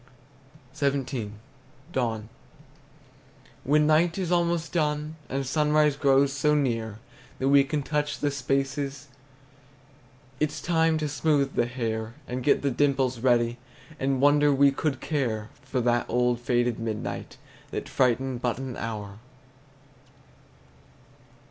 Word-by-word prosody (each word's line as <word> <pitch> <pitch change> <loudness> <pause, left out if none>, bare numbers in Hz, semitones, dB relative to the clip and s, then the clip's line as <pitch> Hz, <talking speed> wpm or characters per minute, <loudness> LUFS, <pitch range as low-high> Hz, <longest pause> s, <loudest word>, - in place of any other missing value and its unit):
XVII. 130 -6 -1 0.6
DAWN. 115 -4 -1 1.4
When 150 +2 +3
night 165 +3 +3
is 180 -3 -2
almost 170 -1 +1
done, 150 -1 -1
And 135 +1 -2
sunrise 150 +1 +2
grows 140 -1 +3
so 150 +1 +2
near 115 -7 -1 0.4
That 135 - 0
we 140 0 +6
can 140 +1 -2
touch 150 0 -1
the 145 - 0
spaces, 140 +1 -2 1.3
It 150 -1 +1
's - - -6
time 165 -2 +2
to 155 -1 -1
smooth 145 -1 +1
the 120 - +1
hair 115 -2 -3
And 125 +1 -3
get 140 - +3
the 140 - +1
dimples 135 -2 +1
ready, 120 -1 +2 0.4
And 135 0 0
wonder 145 +1 +5
we 140 0 +5
could 140 +1 -2
care 115 -8 -2
For 130 0 -3
that 120 0 +1
old 125 -1 +1
faded 120 0 0
midnight 110 -2 -4 0.3
That - - -5
frightened 130 0 +1
but 125 -2 0
an 130 -2 -6
hour. 105 -3 -5
135 Hz, 125 wpm, -26 LUFS, 120-150 Hz, 1.4 s, we